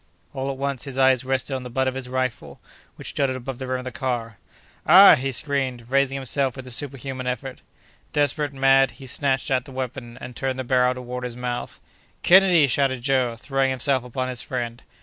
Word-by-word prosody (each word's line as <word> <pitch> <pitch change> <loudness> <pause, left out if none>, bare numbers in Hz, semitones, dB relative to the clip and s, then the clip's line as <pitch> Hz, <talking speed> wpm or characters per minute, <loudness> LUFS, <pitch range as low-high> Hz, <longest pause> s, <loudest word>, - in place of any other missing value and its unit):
All 135 0 -3
at 135 - -4
once, 140 -1 -3
his 135 -2 -6
eyes 130 -1 +4
rested 130 +1 -1
on 130 - -2
the 125 - -8
butt 130 +2 0
of 130 - 0
his 130 -1 -6
rifle, 130 -1 -3 0.4
which - - -9
jutted 135 -2 0
above 130 0 -6
the 130 - -5
rim 130 0 -1
of 130 - -7
the 130 - -6
car. 120 -5 -3 0.5
"Ah!" 190 +6 +10
he 135 -2 0
screamed, 130 -3 -2
raising 135 0 +2
himself 135 -1 -1
with 130 -1 -8
a 130 - -6
superhuman 135 -1 -1
effort. 125 +1 -4 0.5
Desperate, 145 0 +1
mad, 135 0 +4
he 135 - -11
snatched 135 +1 -1
at 130 -1 +1
the 135 - -11
weapon, 130 -2 -6
and 125 - -9
turned 130 0 -2
the 130 - -3
barrel 125 0 +2
toward 125 0 -6
his 125 -1 -5
mouth. 125 0 -5 0.4
"Kennedy!" 180 -4 +6
shouted 130 -2 0
Joe, 130 -3 +1
throwing 135 +3 -1
himself 130 0 +1
upon 130 +1 -4
his 125 -1 -4
friend. 120 -1 -4
130 Hz, 205 wpm, -23 LUFS, 125-135 Hz, 0.5 s, Ah